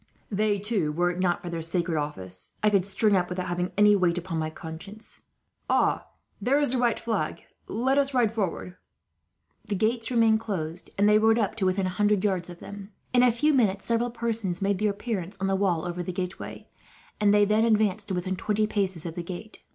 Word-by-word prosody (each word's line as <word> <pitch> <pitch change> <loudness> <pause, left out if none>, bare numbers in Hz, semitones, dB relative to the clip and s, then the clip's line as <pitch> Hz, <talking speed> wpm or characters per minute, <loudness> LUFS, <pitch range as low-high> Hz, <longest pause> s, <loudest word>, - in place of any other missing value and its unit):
They, 210 0 +1
too, 200 -6 0
were 175 +3 +1
it 175 - -6
not 180 -2 +1
for 175 - -5
their 165 -1 -3
sacred 170 +1 -1
office, 95 -12 -5
I 210 - +4
could 195 -2 +2
string 205 +1 +2
up 180 -1 +1
without 180 0 -3
having 175 0 -2
any 210 0 +6
weight 180 -3 +2
upon 170 -2 -3
my 155 0 -1
conscience. 170 +7 -9 0.5
"Ah! - - +2 0.3
There 275 +4 +3
is 290 -4 +1
the 255 - +1
white 240 -2 +2
flag. 230 -1 -2 0.2
Let 265 +4 +1
us 275 0 +1
ride 240 -5 +2
forward." 185 -3 -3 0.9
The 205 - -2
gates 225 +3 0
remained 225 -3 +4
closed, 180 -6 -4
and 205 +1 +4
they 210 0 +6
rode 220 +1 +4
up 210 -4 +1
to 190 -4 +1
within 185 +1 +1
a - - 0
hundred 205 +1 +1
yards 185 -4 0
of 175 - -9
them. 200 -1 -9 0.2
In 245 - +5
a 250 -1 +6
few 300 +7 +2
minutes 205 -7 +2
several 235 +1 +1
persons 230 -6 -2
made 200 -1 0
their 210 0 +2
appearance 200 -2 -4
on 195 - -1
the 195 0 +1
wall 185 -5 +1
over 175 0 -3
the 175 - -4
gateway, 180 +1 -6 0.5
and 205 -1 +4
they 205 0 +5
then 215 +2 +3
advanced 215 -2 +2
to 190 - -2
within 185 +1 -2
twenty 215 +3 0
paces 190 -6 -1
of 165 - -4
the 175 - -4
gate. 185 +5 -8
200 Hz, 215 wpm, -26 LUFS, 180-220 Hz, 0.9 s, any